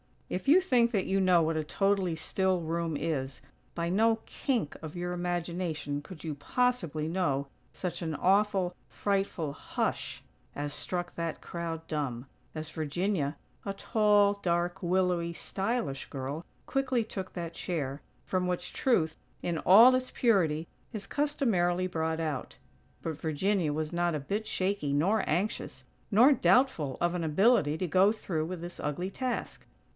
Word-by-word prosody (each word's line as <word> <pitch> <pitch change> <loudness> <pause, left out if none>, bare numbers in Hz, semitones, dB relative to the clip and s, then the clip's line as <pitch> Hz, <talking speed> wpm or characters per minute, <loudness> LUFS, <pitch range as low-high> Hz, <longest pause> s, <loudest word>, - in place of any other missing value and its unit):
If 185 - -4
you 335 +7 +7
think 245 -9 +3
that 200 -5 +1
you 195 +1 +1
know 180 -3 +5
what 160 0 0
a 155 - 0
totally 195 +1 +1
still 185 +3 0
room 165 0 -2
is, 135 -5 -2 0.3
by 170 0 -1
no 225 +4 +3
kink 240 - -1
of 160 0 -7
your 175 0 -3
imagination 175 -4 -2
could 160 +1 -11
you 160 -2 -3
possibly 170 - 0
know 160 -6 0 0.3
such 180 -1 -4
an 160 -3 -2
awful, 195 0 +2
frightful 195 -6 -1
hush - - -3 0.3
as 145 0 -3
struck 175 -1 -3
that 165 -1 -3
crowd 165 -1 -5
dumb, 140 -6 -3 0.3
as 155 0 -5
Virginia, 160 0 -1 0.3
a 200 - -2
tall, 205 0 +3
dark, 175 -1 -1
willowy, 180 -1 +1
stylish 195 - -2
girl 140 +4 -5 0.2
quickly 260 -3 +1
took 190 -3 -6
that 170 -2 -5
chair, 145 -6 -3 0.2
from 185 -1 -1
which 180 -1 -2
Truth, 165 -12 +1 0.3
in 170 -2 -1
all 225 +7 +8
its 255 0 0
purity, 170 -10 +2 0.3
is 210 -2 -5
customarily 200 -12 +1
brought 160 -2 -1
out. 150 -5 -3 0.5
But 160 -2 -4
Virginia 165 +1 +1
was 155 +1 -3
not 175 -1 +1
a - - -1
bit 205 +10 -3
shaky 185 -7 0
nor 190 +10 +2
anxious, 185 +7 -1 0.3
nor 235 +7 +7
doubtful 250 - +3
of 175 0 +2
an 175 -2 -2
ability 160 -1 +3
to 180 - -1
go 190 +4 +5
through 170 -8 -2
with 175 0 -5
this 175 0 -7
ugly 175 +6 -2
task. 255 +2 -3
175 Hz, 150 wpm, -30 LUFS, 160-200 Hz, 0.5 s, all